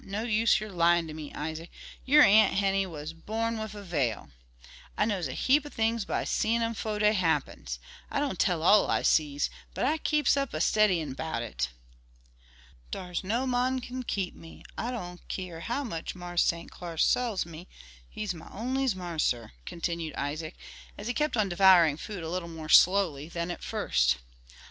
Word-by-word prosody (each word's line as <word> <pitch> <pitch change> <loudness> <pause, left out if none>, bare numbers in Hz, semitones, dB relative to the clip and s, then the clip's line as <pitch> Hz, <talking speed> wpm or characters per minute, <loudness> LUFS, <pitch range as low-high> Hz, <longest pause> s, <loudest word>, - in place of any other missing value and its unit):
No 200 +3 -4
use 225 -1 +3
yer 215 +1 -6
lyin' 170 -1 +3
ter 155 - -7
me, 155 -2 -7
Isaac, 160 +2 -5 0.4
yer 295 +3 +7
Aunt 215 +1 +6
Henny 195 -1 +1
was 155 -2 -7
born 225 +6 -3
wif 220 -1 -5
a 205 - -8
veil. 135 - -2 0.7
I - - +3
knows 195 -7 -1
a 130 - -5
heap 285 +3 +3
o' 295 - -8
things 225 -4 0
by - - -1
seein' 230 +1 +1
'em 230 0 -1
fo' 215 -1 -3
dey 210 0 +4
happens. 150 - -1 0.3
I - - -1
don' 285 -7 -1
tell 175 -2 +1
all 205 +4 +5
I - - +1
sees, 145 -2 +2 0.2
but - - 0
I 310 +4 +1
keeps 300 -3 +2
up 275 - -2
a - - -1
steddyin' 175 -6 +2
'bout 140 -5 -3
it." 65 - -3 1.2
"Dar's 180 - -4
no 230 +7 0
mon 255 +1 +1
can 255 +1 -6
keep 195 -7 -2
me, 165 - -13
I 235 - -3
don't 180 -8 -6
keer 180 -3 -5
how 240 +11 -2
much 165 -11 -5
Marse 175 -1 -1
St. 170 0 -2
Clar 170 -2 -8
sells 230 +2 +2
me; 170 +1 -10 0.4
he's 210 -3 -3
my 160 - -11
onlies' 255 +1 -1
marser," 160 -10 -2 0.2
continued 170 -2 -3
Isaac, 155 +4 -4 0.4
as 205 - -8
he 245 - -1
kept 300 -1 0
on 215 -2 +2
devouring 175 -5 +6
food 195 0 -6
a 160 - -4
little 180 -1 -3
more 160 -2 -8
slowly 170 -6 +5
than 170 0 -3
at - - -7
first. - - +1
185 Hz, 185 wpm, -29 LUFS, 160-225 Hz, 1.2 s, yer